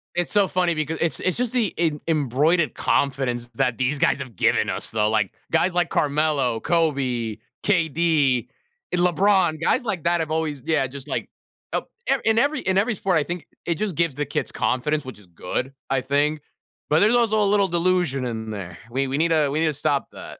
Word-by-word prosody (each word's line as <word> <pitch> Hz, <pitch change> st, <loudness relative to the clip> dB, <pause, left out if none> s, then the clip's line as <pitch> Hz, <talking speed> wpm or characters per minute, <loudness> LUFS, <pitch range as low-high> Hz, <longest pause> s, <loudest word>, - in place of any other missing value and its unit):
It's 175 Hz, -1 st, 0 dB
so 205 Hz, -2 st, +3 dB
funny 180 Hz, -2 st, +1 dB
becau 155 Hz, +1 st, -2 dB
it's 165 Hz, -, 0 dB
it's 185 Hz, +2 st, -1 dB
just 250 Hz, -1 st, -1 dB
the 230 Hz, -7 st, +1 dB
em 155 Hz, -3 st, +1 dB
embroidered 155 Hz, +2 st, +1 dB
confidence 125 Hz, -4 st, 0 dB
that 125 Hz, -2 st, 0 dB
these 130 Hz, +3 st, 0 dB
guys 140 Hz, -, +2 dB
have 125 Hz, -5 st, -8 dB
given -, -, +2 dB
us, -, -, -1 dB
though, 105 Hz, -1 st, +1 dB
like, 110 Hz, -3 st, 0 dB, 0.2 s
guys 170 Hz, +3 st, +2 dB
like 175 Hz, -1 st, +1 dB
Carmelo, 145 Hz, -5 st, +1 dB
Kobe, 130 Hz, -9 st, 0 dB, 0.3 s
KD, 160 Hz, -, +2 dB, 0.5 s
LeBron, 180 Hz, -1 st, +3 dB
guys 250 Hz, +9 st, +2 dB
like 190 Hz, -9 st, -3 dB
that 170 Hz, 0 st, +2 dB
have 160 Hz, -2 st, -2 dB
always 155 Hz, -4 st, -2 dB
yeah, 160 Hz, -4 st, +2 dB
just 135 Hz, +2 st, -9 dB
like, -, -, -3 dB, 0.4 s
up, -, -, -2 dB, 0.2 s
e -, -, +4 dB
in 220 Hz, 0 st, +3 dB
every 290 Hz, +4 st, +2 dB
in 190 Hz, 0 st, 0 dB
every 215 Hz, +4 st, +2 dB
sport, 190 Hz, -2 st, +1 dB
I 155 Hz, -, +2 dB
think 175 Hz, +2 st, -6 dB, 0.2 s
it 170 Hz, -, 0 dB
just 200 Hz, 0 st, -2 dB
gives 170 Hz, -2 st, +1 dB
the 150 Hz, -, -2 dB
kids 145 Hz, -, -3 dB
confidence, 150 Hz, +4 st, 0 dB
which 130 Hz, -4 st, -9 dB
is 105 Hz, -, -17 dB
good, 90 Hz, +9 st, -4 dB, 0.2 s
I 135 Hz, -1 st, +1 dB
think. 145 Hz, +3 st, 0 dB, 0.5 s
But 150 Hz, +2 st, +4 dB
there's 215 Hz, +4 st, +4 dB
also 220 Hz, -3 st, +3 dB
a -, -, +3 dB
little 200 Hz, -1 st, +3 dB
delusion 170 Hz, -6 st, +1 dB
in 110 Hz, -2 st, -4 dB
there. 90 Hz, -5 st, -7 dB
We 135 Hz, +2 st, 0 dB
we 135 Hz, +1 st, -1 dB
need 165 Hz, +2 st, +2 dB
to 155 Hz, -3 st, +3 dB
we 155 Hz, +3 st, -1 dB
need -, -, +3 dB
to 155 Hz, -, 0 dB
stop 140 Hz, 0 st, 0 dB
that. -, -, -10 dB
155 Hz, 205 wpm, -23 LUFS, 135-175 Hz, 0.5 s, e